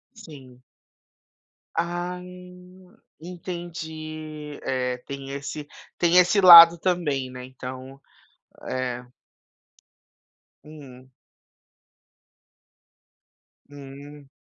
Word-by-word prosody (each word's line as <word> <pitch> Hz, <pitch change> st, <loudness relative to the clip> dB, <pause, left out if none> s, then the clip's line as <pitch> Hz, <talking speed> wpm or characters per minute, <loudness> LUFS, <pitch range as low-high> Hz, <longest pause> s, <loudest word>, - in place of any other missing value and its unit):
Sim. 135 Hz, -, -14 dB, 1.1 s
Ah, 175 Hz, +2 st, -3 dB
en 180 Hz, +1 st, -15 dB, 0.2 s
entendi, 160 Hz, -3 st, -8 dB
é, 125 Hz, -1 st, -2 dB
tem 140 Hz, 0 st, -8 dB
esse 145 Hz, +1 st, -7 dB, 0.3 s
tem 175 Hz, 0 st, +3 dB
esse 180 Hz, +3 st, +4 dB
lado 170 Hz, -2 st, +10 dB
também, 150 Hz, -8 st, -2 dB
né, 125 Hz, 0 st, -9 dB
então, 130 Hz, +1 st, -10 dB, 0.7 s
é. 125 Hz, -1 st, -4 dB, 1.6 s
Hum. 135 Hz, -4 st, -14 dB, 2.6 s
Hum. 145 Hz, 0 st, -13 dB
155 Hz, 65 wpm, -24 LUFS, 135-175 Hz, 2.6 s, lado